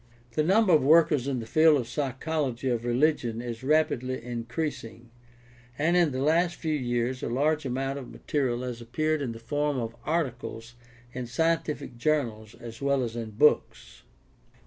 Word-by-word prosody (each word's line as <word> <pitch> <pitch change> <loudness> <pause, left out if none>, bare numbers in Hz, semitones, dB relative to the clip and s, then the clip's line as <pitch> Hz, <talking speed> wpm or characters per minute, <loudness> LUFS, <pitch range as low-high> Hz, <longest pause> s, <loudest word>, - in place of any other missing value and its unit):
The 135 - 0
number 190 +4 +4
of 155 - +6
workers 150 -2 +4
in 135 -3 -1
the - - -7
field 155 +5 +5
of 120 - -4
psychology 135 -1 -2
of 120 -1 -1
religion 120 -2 +1
is 120 -1 -5
rapidly 130 -3 +1
increasing, 120 0 -5 0.7
and 165 +4 +2
in 175 -4 +4
the 130 +1 -2
last 170 +3 +2
few 160 -2 -2
years 125 -2 -1
a - - -3
large 150 +4 +1
amount 135 +2 -2
of 130 - -9
material 125 -4 -2
has 125 -2 -5
appeared 155 +6 -1
in 130 -4 -2
the 115 - -8
form 145 +5 -1
of 115 -2 -4
articles 125 -7 -3 0.4
in 125 -1 -5
scientific 150 -1 -1
journals 120 -7 -1
as 115 -1 -10
well 140 -1 +1
as 115 -1 -4
in 115 -2 -4
books. 115 +8 +1
130 Hz, 165 wpm, -27 LUFS, 120-155 Hz, 0.7 s, of